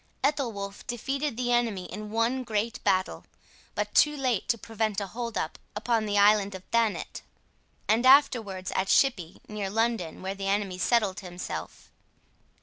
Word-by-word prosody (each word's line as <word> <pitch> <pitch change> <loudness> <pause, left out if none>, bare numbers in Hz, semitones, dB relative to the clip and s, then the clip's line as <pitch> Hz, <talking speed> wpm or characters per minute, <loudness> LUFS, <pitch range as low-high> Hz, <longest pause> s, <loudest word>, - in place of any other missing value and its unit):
Ethelwolf 230 -9 -1
defeated 270 +2 -2
the 245 -1 0
enemy 230 -6 +1
in 210 +3 -7
one 230 +4 0
great 220 -1 -2
battle, 185 0 +1 0.5
but - - -2
too 300 0 +4
late 255 -7 0
to 235 - +2
prevent 220 -1 -2
a 200 - -3
hold 230 +3 -5
up 160 - -3 0.2
upon 220 0 0
the 205 0 0
island 200 -1 +4
of 190 - -9
Thanet, 230 -3 0 0.7
and 225 +3 +3
afterwards 230 -9 +4
at 190 - 0
Shippey, 190 -11 +2
near 210 -2 -4
London, 225 -6 -1
where 190 +1 -2
the 195 0 -5
enemy 195 -2 -1
settled 210 -3 +2
himself. 180 -2 -7
215 Hz, 150 wpm, -28 LUFS, 195-240 Hz, 0.7 s, too